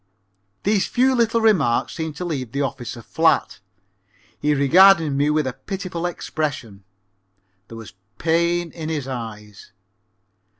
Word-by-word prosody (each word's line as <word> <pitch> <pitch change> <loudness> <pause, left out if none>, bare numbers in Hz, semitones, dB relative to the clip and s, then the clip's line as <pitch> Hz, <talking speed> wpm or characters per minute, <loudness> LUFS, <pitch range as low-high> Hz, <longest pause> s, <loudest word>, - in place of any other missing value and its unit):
'" 100 +1 -47
These 205 -1 +1
few 260 +2 +2
little 230 -2 +1
remarks 165 - +2
seemed 160 -2 -5
to 180 - -5
leave 130 -9 -4
the 140 +1 0
officer 120 -4 -5
flat. - - +1 0.8
He 150 0 +1
regarded 165 +3 +5
me 140 +2 +1
with 150 -1 +1
a 130 - -3
pitiful 185 -2 -5
expression. 145 - -5 0.8
There 115 - -10
was 110 -4 -11 0.2
pain 170 +1 0
in 160 -2 -6
his 150 -5 -3
eyes. 105 -5 -8
150 Hz, 135 wpm, -21 LUFS, 125-175 Hz, 0.8 s, regarded